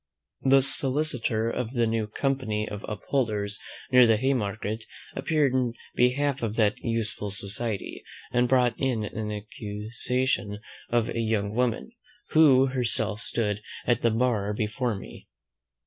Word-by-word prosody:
The 135 0 +5
solicitor 130 -5 +4
of 120 +1 -3
the 120 -2 +2
new 110 -1 -1
Company 110 -3 -1
of 105 -1 -7
Upholders, 105 -2 -2 0.3
near 125 -1 +7
the 110 -1 +4
Haymarket, 110 -3 -1 0.3
appeared 145 -1 +1
in 125 -3 +1 0.2
behalf 135 +3 +1
of 110 -2 -2
that 110 -2 +2
useful 115 -3 -3
society, 100 +2 -4 0.3
and 125 0 +2
brought 125 -2 +3
in 125 -5 0
an 105 +1 -4
accusation 105 +1 -3 0.3
of 120 -1 +1
a - - -3
young 110 -2 0
woman, 125 - -1 0.4
who 140 -4 +6
herself 115 -3 0
stood 105 -3 -2 0.2
at 120 -2 +2
the 115 - +3
bar 110 -3 0
before 110 +2 -1
me. 95 - -11
115 Hz, 130 wpm, -26 LUFS, 105-125 Hz, 0.4 s, near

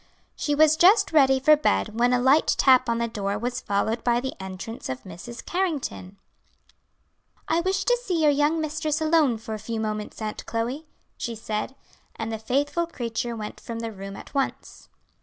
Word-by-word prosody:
She 295 - -1
was 310 +1 +5
just 400 +3 +5
ready 270 -4 +5
for 305 +3 +6
bed 210 - 0
when 245 +1 +4
a 250 - +3
light 265 +5 +4
tap 255 -2 +5
on 230 - +1
the 235 0 0
door 205 -3 -2
was 245 +3 -3
followed 220 +3 -1
by 240 -1 +2
the 265 +2 -4
entrance 190 +4 -7
of 130 0 -5
Mrs. 190 +7 -9
Carrington. 300 - -3 1.3
"I 330 +1 +2
wish 375 +2 0
to - - +3
see 360 -8 -1
your 300 - +6
young 295 +3 +2
mistress 310 0 -1
alone 310 -6 +3
for 220 0 -7
a 215 - -4
few 225 +1 -4
moments, 215 -1 -4
Aunt 215 -1 -4
Chloe," 245 +7 -3 0.3
she 235 - -4
said, 215 +3 -4 0.4
and 225 0 -4
the 220 - -4
faithful 290 +9 0
creature 235 -5 -3
went 215 -1 -7
from 230 - -7
the 230 0 -4
room 195 -1 -8
at - - -11
once. 275 -2 -3
245 Hz, 185 wpm, -25 LUFS, 220-305 Hz, 1.3 s, for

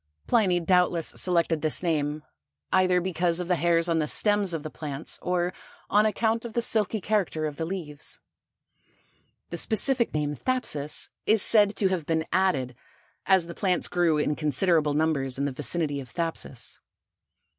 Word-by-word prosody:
Pliny 195 -7 +2
doubtless 175 -1 +1
selected 170 -3 +1
this 155 +3 0
name, 150 -3 -1 0.5
either 185 -1 +3
because 175 -1 -1
of 180 - -4
the 180 - +2
hairs 170 +1 +2
on 165 -1 +1
the 150 - 0
stems 205 +2 +3
of 165 -3 -3
the 155 - -6
plants 150 -1 -4
or 180 0 -1 0.4
on 210 +1 +4
account 225 +2 0
of 235 -2 -7
the 235 - 0
silky 220 -1 +1
character 195 -6 -1
of 150 -2 -5
the 160 - -3
leaves. 160 -6 -5 1.3
The 170 - -4
specific 235 +5 +2
name, 150 -1 -1
thapsus, 150 - -1 0.2
is 215 -2 +4
said 210 -2 +4
to 195 - +1
have 175 -5 -3
been 160 -1 0
added, 145 -10 +1 0.5
as 190 -3 +4
the 170 - -8
plants 180 -1 0
grew 175 -3 +1
in 150 0 0
considerable 155 0 +1
numbers 145 -4 0
in 140 - -1
the 140 - -1
vicinity 145 +2 -1
of 130 -2 -9
Thapsus. 165 -7 -3
170 Hz, 165 wpm, -26 LUFS, 150-190 Hz, 1.3 s, on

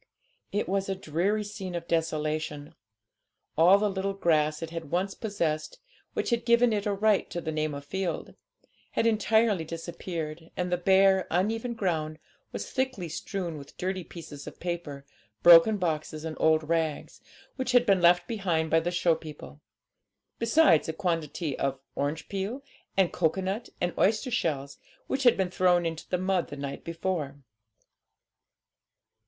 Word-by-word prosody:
It 205 - -1
was 195 +1 -1
a 195 - 0
dreary 190 +5 0
scene 195 -3 -6
of 170 0 -5
desolation; 155 -2 -2 0.8
all 175 +5 +7
the 210 +1 +1
little 195 0 -2
grass 155 -4 +1
it 165 - -6
had 165 -3 -6
once 190 +4 0
possessed, 165 -8 -2 0.4
which - - -2
had 235 0 +1
given 235 0 +4
it 205 0 -1
a - - +1
right 210 0 +2
to 175 - -4
the 160 -2 -4
name 155 -1 -1
of 140 0 -8
field, 185 +4 -3 0.6
had - - +1
entirely 220 -3 +3
disappeared, 165 -1 -6
and 180 0 -1
the 180 - +2
bare, 190 +1 +4
uneven 225 +7 0
ground 160 -7 -1 0.3
was - - -6
thickly 260 -10 -2
strewn 170 -1 -4
with 140 - -13
dirty 185 0 -2
pieces 160 -4 -10
of - - -9
paper, 170 -6 -5 0.4
broken 175 +5 +8
boxes, 155 -3 -2
and 160 -1 -4
old 155 -1 +3
rags, 160 -2 -2 0.3
which 260 -1 -2
had 245 -1 +5
been 195 -5 +3
left 175 +1 +5
behind 175 -8 -1
by 165 - +5
the 165 +2 -2
show 175 -1 +2
people; 155 -2 -9 0.8
besides 230 - +4
a - - -1
quantity 160 -4 -2
of 135 -1 -1
orange 145 +3 -2
peel 200 +8 -4 0.3
and 190 -3 +3
cocoa 170 +2 +1
nut 195 +5 -3
and 175 0 -1
oyster 215 +5 +2
shells, 140 - -2 0.3
which 270 - -2
had 245 -3 +5
been 190 -2 0
thrown 180 -1 +3
into 165 -1 -4
the 180 - +1
mud 185 -1 0
the 145 - -8
night 140 0 -5
before. 165 -4 -3
175 Hz, 160 wpm, -28 LUFS, 155-195 Hz, 0.8 s, broken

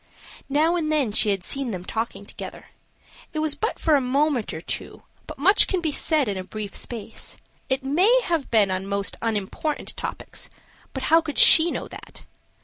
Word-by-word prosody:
Now 310 +5 +2
and 310 -2 -1
then 285 -8 +1
she 215 +1 +3
had 195 -3 -1
seen 275 +5 -1
them 185 -4 -5
talking 220 -2 -4
together; - - -9 0.6
it - - -5
was 310 -1 +1
but 445 - -3
for 315 - +1
a 285 - +4
moment 265 -1 0
or 160 - -6
two, 165 - -6 0.2
but - - -8
much 390 +9 +4
can 375 - 0
be 325 -3 -1
said 295 -1 +1
in 200 -2 -2
a 185 - -4
brief 205 +1 -7
space; 225 -2 -6 0.3
it 265 +1 0
may 375 - +3
have 330 -8 -1
been 210 -4 +3
on 185 +1 -3
most 200 0 -1
unimportant 225 +7 -3
topics, - - -6 0.4
but 265 - -5
how 330 - +7
could 295 -5 -6
she 320 +6 +9
know - - -4
that? - - -12
270 Hz, 190 wpm, -24 LUFS, 210-310 Hz, 0.6 s, she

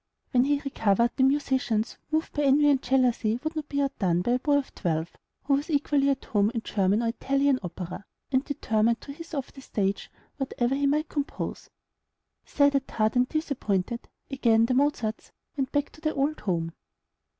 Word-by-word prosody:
When 250 -1 +4
he 290 0 +2
recovered, 235 -3 +2
the - - 0
musicians, 265 -5 +1
moved 315 +1 -1
by 295 - -1
envy 290 +1 +5
and 270 -2 +2
jealousy, 245 -3 +2
would 315 +1 -3
not 305 -2 -4
be 285 0 0
outdone 180 -10 0
by 240 - 0
a 250 - +2
boy 285 +2 +2
of 280 - -3
twelve, 165 -2 -2 0.3
who 280 - +1
was 285 +4 0
equally 285 -2 +2
at 275 -1 -1
home 205 -1 +2
in 225 - -2
German 200 +2 +1
or 230 - +1
Italian 275 +2 +1
opera, 180 +1 -6 0.3
and 260 0 +2
determined 230 -5 +1
to 280 - -8
hiss 330 +2 -9
off 275 -2 -4
the 270 - -11
stage 200 -5 -2 0.3
whatever 260 -2 -1
he 280 +1 +1
might 300 +3 +1
compose. 285 -2 -4 0.8
Sad 285 -1 +3
at 275 -1 0
heart, 215 +1 0
and 250 0 +3
disappointed, 235 - -2 0.2
again 230 -4 +3
the 250 - 0
Mozarts 250 -5 0 0.2
went 270 -2 -2
back 290 -1 0
to 310 - -17
the 310 -1 -1
old 285 +2 0
home. 165 -5 -2
265 Hz, 185 wpm, -27 LUFS, 220-285 Hz, 0.8 s, envy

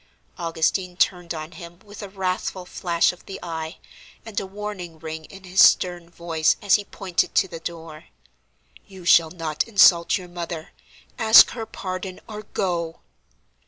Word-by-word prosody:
Augustine 170 +2 -1
turned 175 -3 +1
on 155 -1 -5
him 170 -2 -11
with 205 +1 -11
a 205 - -7
wrathful 185 -1 -3
flash 170 -2 +1
of 180 - -17
the 195 - -7
eye, 160 -1 -5 0.5
and 220 -2 -3
a 195 - -6
warning 190 -4 -7
ring 160 0 -7
in 195 +3 -13
his 185 +1 +4
stern 175 -2 +3
voice, 165 -2 0
as 200 -2 +1
he 205 - +4
pointed 185 -3 -2
to 190 - +4
the 170 -2 -8
door. 165 -1 -8 0.8
"You 190 -3 -13
shall 165 -1 +6
not 160 -1 -3
insult 185 -6 +5
your 180 - -9
mother! 170 -2 -6 0.5
Ask 220 -1 +8
her 225 -2 -6
pardon, 185 0 -6
or 215 -1 -7
go!" 175 -5 -3
175 Hz, 160 wpm, -23 LUFS, 165-195 Hz, 0.8 s, Ask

